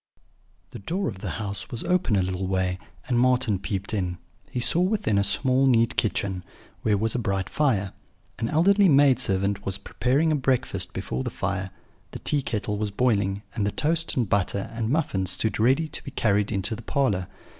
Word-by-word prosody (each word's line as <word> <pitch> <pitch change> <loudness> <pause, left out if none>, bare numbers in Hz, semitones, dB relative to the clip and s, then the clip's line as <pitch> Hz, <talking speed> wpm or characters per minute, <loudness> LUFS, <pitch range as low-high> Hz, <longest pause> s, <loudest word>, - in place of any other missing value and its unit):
The - - -8
door 180 - -2
of 100 -5 -5
the - - -4
house 100 -3 -5
was 115 - -5
open 180 - +1
a 95 - +2
little 95 +1 -2
way, 95 -1 0 0.3
and 120 -2 +2
Marten 125 -5 +3
peeped 100 +1 -3
in: 90 -4 -1 0.3
he 125 - -3
saw 160 +8 +1
within 185 - +1
a - - +2
small 130 +6 +2
neat 115 -1 +3
kitchen, 95 -4 -1 0.4
where 105 -2 +2
was 110 +2 0
a 125 - -1
bright 95 -4 -1
fire; 105 -11 0 0.5
an 115 - -1
elderly 195 +5 +4
maid 140 -3 +5
servant 100 -3 +1
was 95 0 -3
preparing 145 +9 +1
breakfast 130 -1 0
before 65 +1 -3
the - - -2
fire; 95 0 -3 0.4
the - - -4
tea 145 - 0
kettle 105 -4 -2
was 105 -1 -1
boiling; 100 -3 +1
and 110 - -1
the 100 - 0
toast 165 +4 0
and 120 -4 +2
butter 100 0 0
and 115 -1 -2
muffins 120 - 0
stood 95 +3 -1
ready 130 +8 +3
to - - -4
be - - -6
carried 105 -6 +1
into 100 +2 -1
the 115 - -9
parlour. 105 -8 0
110 Hz, 190 wpm, -25 LUFS, 100-130 Hz, 0.5 s, maid